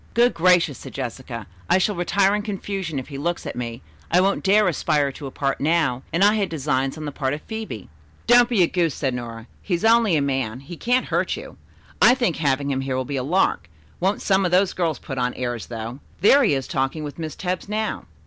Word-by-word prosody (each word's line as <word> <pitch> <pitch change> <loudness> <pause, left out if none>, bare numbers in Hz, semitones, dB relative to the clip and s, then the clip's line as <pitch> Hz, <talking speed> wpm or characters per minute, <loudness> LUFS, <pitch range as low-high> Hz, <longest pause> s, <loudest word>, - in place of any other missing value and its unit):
"Good 240 +1 +4
gracious," 175 -4 +3
said - - -10
Jessica. 125 -2 -5 0.2
"I - - +5
shall 200 +3 +1
retire 195 +2 +2
in 210 - 0
confusion 195 -6 -4
if 130 - -5
he 140 -2 -6
looks 170 +4 -2
at - - -5
me. 115 -4 -5 0.3
I 175 - +4
won't 195 +2 +1
dare 205 +1 +4
aspire 150 -4 +1
to 140 +1 -8
a - - -5
part 135 0 -2
now, 145 -5 +1
and 170 +4 +2
I 205 +1 +6
had 205 -3 0
designs 135 -3 -1
on 155 - -6
the 145 - -4
part 135 0 -1
of 150 - -10
Phebe." 220 - -6 0.4
"Don't 240 0 +6
be 215 -7 +4
a - - +3
goose," 170 -4 0
said 135 -3 -1
Nora. 115 -2 -6 0.2
"He's 180 +2 -1
only 225 -5 +5
a 150 - +2
man. 130 -3 -2
He 155 +6 -9
can't 245 +8 +1
hurt - - 0
you. - - -9 0.5
I 245 - +7
think 240 - 0
having 140 -2 0
him 135 -1 -1
here 135 -1 -2
will 130 - -2
be 140 +1 -3
a - - 0
lark. 155 - +1 0.3
Won't 190 +3 0
some 195 -1 +3
of 180 - +1
those 185 +2 +3
girls 165 -5 -1
put 135 +1 -6
on 125 0 -1
airs, 120 -3 -4
though. 115 +2 -6 0.2
There 275 +8 +6
he 200 - +3
is 135 -1 -3
talking 135 +3 -1
with 145 +2 -7
Miss 155 -2 -5
Tebbs 185 +1 -3
now." 215 0 -2
160 Hz, 235 wpm, -23 LUFS, 135-195 Hz, 0.5 s, I